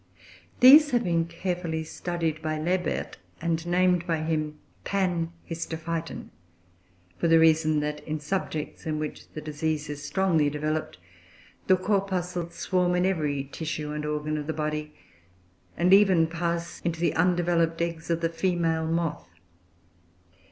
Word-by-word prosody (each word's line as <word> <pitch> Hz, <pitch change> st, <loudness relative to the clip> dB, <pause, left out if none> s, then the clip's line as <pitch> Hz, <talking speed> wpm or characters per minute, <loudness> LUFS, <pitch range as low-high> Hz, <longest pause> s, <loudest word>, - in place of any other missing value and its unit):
These 290 Hz, +4 st, +9 dB
have 240 Hz, -3 st, +1 dB
been 170 Hz, -3 st, +1 dB
carefully 170 Hz, -1 st, -3 dB
studied 165 Hz, -1 st, -3 dB
by 155 Hz, 0 st, -2 dB
Lebert, 175 Hz, +3 st, -1 dB, 0.2 s
and 165 Hz, -1 st, -1 dB
named 180 Hz, 0 st, +2 dB
by 165 Hz, -2 st, 0 dB
him 155 Hz, -1 st, -2 dB, 0.3 s
Panhistophyton; 165 Hz, -3 st, -3 dB, 0.9 s
for -, -, +2 dB
the 165 Hz, 0 st, +6 dB
reason 155 Hz, -1 st, +4 dB
that 150 Hz, 0 st, -3 dB
in 155 Hz, 0 st, -2 dB
subjects 155 Hz, 0 st, -4 dB
in 155 Hz, -1 st, -1 dB
which 150 Hz, -1 st, -5 dB
the 155 Hz, -, -6 dB
disease 155 Hz, 0 st, -2 dB
is 145 Hz, -1 st, -6 dB
strongly 165 Hz, -3 st, +2 dB
developed, 155 Hz, +2 st, -3 dB, 0.7 s
the 185 Hz, -, +5 dB
corpuscles 180 Hz, -3 st, -1 dB
swarm 180 Hz, -1 st, +1 dB
in 180 Hz, 0 st, +2 dB
every 150 Hz, -7 st, 0 dB
tissue 155 Hz, -2 st, -4 dB
and 150 Hz, 0 st, -4 dB
organ 150 Hz, 0 st, -2 dB
of 150 Hz, -, -6 dB
the 160 Hz, -, -1 dB
body, 150 Hz, 0 st, -3 dB, 0.8 s
and 180 Hz, +3 st, +4 dB
even 190 Hz, -5 st, +6 dB
pass 170 Hz, 0 st, -3 dB
into 170 Hz, -1 st, -2 dB
the 170 Hz, -, +1 dB
undeveloped 175 Hz, -2 st, +2 dB
eggs 170 Hz, -1 st, -3 dB
of 170 Hz, 0 st, 0 dB
the 165 Hz, -, +1 dB
female 165 Hz, -2 st, 0 dB
moth. 165 Hz, -, -2 dB
165 Hz, 135 wpm, -27 LUFS, 155-175 Hz, 0.9 s, These